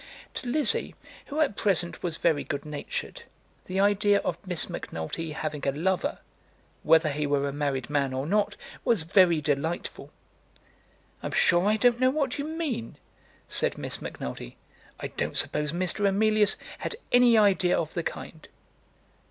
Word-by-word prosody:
To - - -5
Lizzie, 275 0 +3 0.3
who 300 +2 -4
at 275 -9 +1
present 175 -5 +1
was 170 -2 -3
very 155 -4 +1
good 140 +1 -4
natured, 150 -1 -5 0.4
the 185 +1 -3
idea 205 +1 +3
of - - -2
Miss 180 -3 -2
Macnulty 155 - -5
having 150 -2 -4
a - - +3
lover, 175 +6 -1 0.6
whether 160 -1 +4
he 150 0 -2
were 140 0 +1
a 140 - -4
married 140 -4 -2
man 140 -2 0
or 130 +1 -3
not, 205 +4 +1 0.3
was 230 -9 +2
very 170 -1 +4
delightful. 150 +4 -2 1.1
"I'm - - -4
sure 175 +2 +4
I 215 +1 +3
don't 240 +2 +3
know 255 0 +4
what 280 -1 -1
you 285 - -2
mean," 310 - -4 0.5
said - - +2
Miss - - -4
Macnulty. 65 -1 -7 0.4
"I - - -5
don't - - -3
suppose 150 -1 +2
Mr. 185 +4 0
Emilius 210 +1 +3 0.2
had - - -4 0.2
any 245 -2 +6
idea 195 -4 +3
of 160 - -3
the 170 - -1
kind." 160 -1 -7
175 Hz, 155 wpm, -27 LUFS, 150-210 Hz, 1.1 s, any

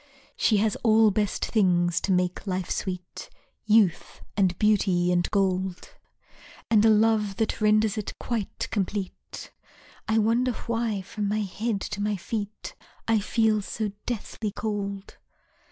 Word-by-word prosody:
She 215 - +3
has 210 0 +1
all 220 -2 +4
best 205 0 -1
things 175 -5 +2
to 195 - -1
make 180 +2 0
life 185 -1 -2
sweet: 180 -2 -5 0.4
Youth, 210 -5 +2
and 185 -3 +2
beauty, 190 -4 +2
and 175 0 +1
gold, 190 -2 -1 0.8
And 215 -2 +5
a 225 - +6
love 215 -2 +3
that 220 +1 -2
renders 215 0 +3
it 210 - -6
quite 225 -5 -3
complete. 200 -2 -4 0.6
(I 220 - +2
wonder 235 +3 +2
why 230 -4 -1
from 205 +2 -4
my 215 +1 0
head 210 +2 -2
to 205 -1 -4
my 210 0 0
feet 210 +2 -5 0.3
I 225 -1 +3
feel 215 +1 +1
so 210 +1 -3 0.2
deathly 220 -2 -3
cold?) 200 -2 -4
210 Hz, 135 wpm, -26 LUFS, 190-220 Hz, 0.8 s, a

